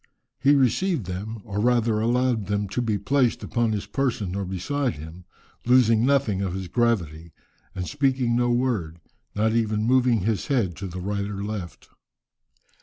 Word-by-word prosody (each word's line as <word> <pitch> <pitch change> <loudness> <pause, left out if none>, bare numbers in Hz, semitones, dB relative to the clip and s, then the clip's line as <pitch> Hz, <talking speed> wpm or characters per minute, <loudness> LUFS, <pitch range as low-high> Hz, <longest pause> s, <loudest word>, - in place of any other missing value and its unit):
He 140 +2 +4
received 140 - +1
them, 100 +5 -5
or 100 -1 -4
rather 115 -1 +2
allowed 120 -2 +1
them 105 0 -1
to 125 - -2
be 110 -3 0
placed 125 +4 +1
upon 120 -2 0
his 105 -2 -2
person 120 -9 -2
or 100 -1 -2
beside 125 +9 -2
him, 80 +4 -10 0.4
losing 115 -2 +4
nothing 135 -9 +2
of 95 -2 -2
his 95 -1 -5
gravity, 85 -8 -1 0.4
and 90 -1 -3
speaking 135 -4 +1
no 120 0 +2
word, 115 -10 -1 0.4
not 110 +1 +1
even 110 -2 0
moving 125 -2 +3
his 105 +2 -1
head 115 - 0
to 95 - -5
the 90 0 -7
right 100 +1 -2
or 100 -1 -5
left." 100 -5 -6
110 Hz, 165 wpm, -24 LUFS, 95-125 Hz, 0.4 s, He